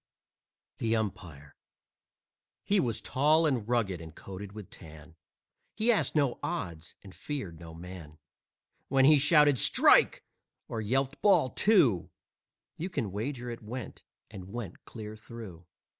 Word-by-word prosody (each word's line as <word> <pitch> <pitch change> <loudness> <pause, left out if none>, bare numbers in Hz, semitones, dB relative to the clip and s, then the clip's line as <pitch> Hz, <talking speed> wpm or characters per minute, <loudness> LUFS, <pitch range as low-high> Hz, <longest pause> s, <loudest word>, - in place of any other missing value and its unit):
THE 115 0 +1
UMPIRE 90 -10 -5 1.1
He 205 0 +2
was 115 - -1
tall 155 +4 +3
and 125 -7 -1
rugged 100 -8 0
and 80 0 -11
coated 100 +1 -9
with 105 -3 -10
tan, 80 +1 -13 0.6
He 225 +2 +3
asked 215 - +1
no 140 -5 +1
odds 85 -3 -5
and 95 -2 -12
he - - -19
feared 100 - -5
no 80 -1 -11
man. 85 -3 -10 0.7
When 135 0 +3
he 150 0 +7
shouted 150 -2 +5
"Strike!" - - +5 0.4
or 110 - -4
yelped 135 +6 -1
"Ball 195 - +4
Two!" 140 - +3 0.7
You 175 +4 -3
can 125 - -3
wager 120 +4 -4
it 115 - -8
went, 115 +1 -7 0.3
and 95 -2 -10
went 110 -6 -7
clear 110 -2 -8
through. 110 -6 -11
110 Hz, 140 wpm, -29 LUFS, 90-135 Hz, 1.1 s, he